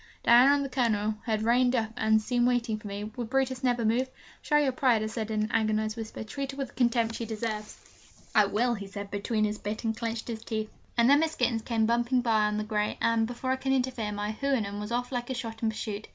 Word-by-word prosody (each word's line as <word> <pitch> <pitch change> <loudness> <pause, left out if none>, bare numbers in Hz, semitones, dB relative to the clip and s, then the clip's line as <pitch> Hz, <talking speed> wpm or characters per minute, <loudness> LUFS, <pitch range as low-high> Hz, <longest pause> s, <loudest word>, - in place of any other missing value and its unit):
Diana 250 +4 +7
and 280 -1 0
the - - -5
Colonel 220 -5 +1
had 215 -1 0
reined 245 +2 +3
up 220 -2 0
and 220 -2 +3
seemed 240 +2 +1
waiting 235 -3 0
for 210 - -9
me 200 +1 -5
would 220 +2 -6
Brutus 265 -1 0
never 245 -2 +1
move? 245 +4 +1 0.3
'Show 295 - +2
your 290 -3 +3
pride,' 250 -5 +2
I - - -1
said 220 0 -4
in 215 -1 0
an 215 - -3
agonised 215 -1 +1
whisper, 225 -1 -6
'Treat 275 +5 -5
her - - -10
with 270 -3 -3
the - - -19
contempt 235 -2 +1
she 230 - -4
deserves!' 215 -1 -4 0.6
'I 215 -2 +6
will,' 235 +5 +1
he 200 -3 -6
said 200 0 -7
between 215 +2 -1
his 210 0 -3
bit 210 +3 -4
and 225 -1 0
clenched 230 0 -4 0.2
teeth. 220 -1 -3 0.3
And 235 0 +5
then 285 +2 +6
Miss 320 0 0
Gittens 240 -2 +1
came 225 -1 0
bumping 240 +2 +2
by 220 -3 +2
on 210 0 0
the 215 - -1
grey, 210 -1 -1
and, 230 -1 +2
before 245 +2 -3
I 260 - +1
could 265 0 0
interfere, 250 -5 -1
my 205 +1 -2
Houyhnhnm 220 -5 -1
was 210 +2 -5
off 245 +1 -1
like 245 -1 -3
a 260 - -2
shot 230 -3 -6
in 225 - +2
pursuit. 215 -1 -5
230 Hz, 245 wpm, -28 LUFS, 215-250 Hz, 0.6 s, Diana